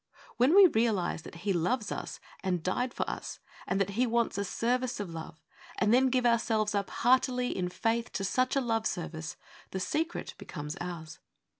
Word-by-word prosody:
When 255 +8 +5
we 400 -1 +10
realize 220 - +2
that - - -11
He 200 - +2
loves 210 +6 0
us - - -5 0.2
and 180 -4 0
died 245 +8 0
for - - -2
us, - - -5 0.3
and 195 - 0
that 195 0 +1
He 245 +5 +1
wants 235 0 +1
a - - +1
service 245 +5 -1
of 200 -4 -4
love, 160 -1 -8 0.3
and 215 +1 +3
then 260 +2 +5
give 250 -1 +1
ourselves 225 -2 +2
up 200 -1 -1
heartily, 250 0 +2
in 180 -1 -1
faith, 230 +5 -1
to 195 - -2
such 255 +7 +1
a 275 - +3
love 225 -3 0
service, 160 -3 -5 0.3
the 190 - -4
secret 320 - -2
becomes 150 +2 -6
ours. 160 -3 -6
220 Hz, 185 wpm, -30 LUFS, 180-250 Hz, 0.3 s, we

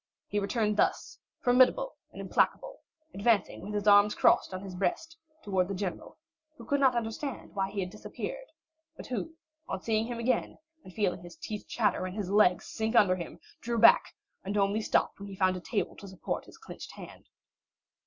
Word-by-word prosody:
He 205 - -1
returned 210 +1 0
thus, - - 0 0.2
formidable 255 - +4 0.2
and - - -11
implacable, - - 0 0.3
advancing 205 0 +1
with 205 +3 -6
his 205 0 -2
arms 205 0 +6
crossed - - +4
on 185 0 -5
his 190 -2 -7
breast, 320 - -2 0.3
towards 190 -2 0
the 195 - -2
general, 185 -2 -5 0.4
who - - -11
could 285 -1 +1
not 265 -3 +4
understand 235 +4 -4
why 195 -1 -1
he 200 0 -3
had 180 -1 -4
disappeared, - - -7 0.5
but - - -8
who 320 +6 -4 0.3
on 190 - -3
seeing 225 0 +1
him 240 -1 -4
again, 235 +2 0 0.3
and 185 - -12
feeling 185 -3 -1
his 175 -1 -12
teeth 210 -1 -6
chatter 210 -5 0
and 185 +3 -7
his 195 -3 -3
legs 200 -3 +4
sink 220 +2 -3
under 200 -5 +5
him, 175 -2 -7 0.2
drew 235 0 -2
back, 230 +1 +6 0.3
and 200 +2 -2
only 200 +2 +2
stopped - - +1
when 200 - -7
he 195 - -8
found 185 -1 +2
a - - -4
table 205 +2 -2
to 200 - -10
support 190 -1 -4
his - - -15
clenched 445 - -10
hand. - - -12
210 Hz, 190 wpm, -30 LUFS, 190-235 Hz, 0.5 s, arms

